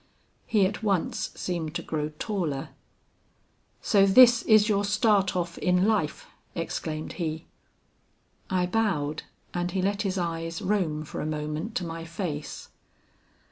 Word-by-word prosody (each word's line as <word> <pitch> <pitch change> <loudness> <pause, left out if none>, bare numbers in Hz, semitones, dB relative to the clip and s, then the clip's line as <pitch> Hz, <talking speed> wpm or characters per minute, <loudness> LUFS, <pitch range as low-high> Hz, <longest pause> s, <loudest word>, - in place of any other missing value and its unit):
He 210 -4 +4
at 205 +3 -2
once 195 -5 0
seemed 170 -3 -3
to - - -2
grow 150 -1 -2
taller. 165 -11 -2 1.1
'So 200 -3 +4
this 240 +3 +8
is 215 -2 +5
your 205 -2 +2
start 205 -2 +2
off 175 -1 -2
in 180 +1 +3
life,' 205 -9 0 0.3
exclaimed 155 -2 -4
he. 160 0 -3 1.0
"I 185 -1 +1
bowed, 180 -8 0 0.3
and 175 0 -1
he 185 +1 -1
let 200 +1 0
his 195 -2 -1
eyes 165 -1 -2
roam 170 -7 0
for - - -5
a - - -2
moment 155 +7 -3
to 180 - -1
my 165 0 -5
face. 165 -3 -5
180 Hz, 140 wpm, -27 LUFS, 160-200 Hz, 1.1 s, this